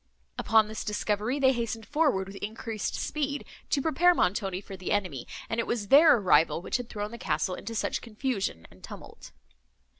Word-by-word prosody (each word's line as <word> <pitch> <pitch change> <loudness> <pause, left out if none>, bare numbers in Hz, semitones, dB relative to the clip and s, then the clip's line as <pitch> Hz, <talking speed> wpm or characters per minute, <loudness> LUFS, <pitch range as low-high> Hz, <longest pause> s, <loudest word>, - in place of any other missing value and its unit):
Upon 220 -1 +4
this 215 0 -5
discovery, 210 +4 -1
they 265 -2 +4
hastened 230 -2 -3
forward 290 -11 +1
with 195 +1 -10
increased 220 +1 -4
speed, 285 -1 -3 0.2
to 275 - +1
prepare 350 +2 +4
Montoni 190 - 0
for 195 0 -9
the 185 -1 -5
enemy; 185 -12 -1 0.2
and 225 - -2
it 230 - -1
was 210 -4 -2
their 295 0 +8
arrival, 165 -6 +3
which 175 - -2
had 245 -1 -7
thrown 210 -1 -4
the 235 - -9
castle 185 - -1
into 225 +5 -6
such - - -1
confusion 215 - -3
and 95 +1 -19
tumult. - - -11
220 Hz, 180 wpm, -28 LUFS, 195-255 Hz, 0.2 s, their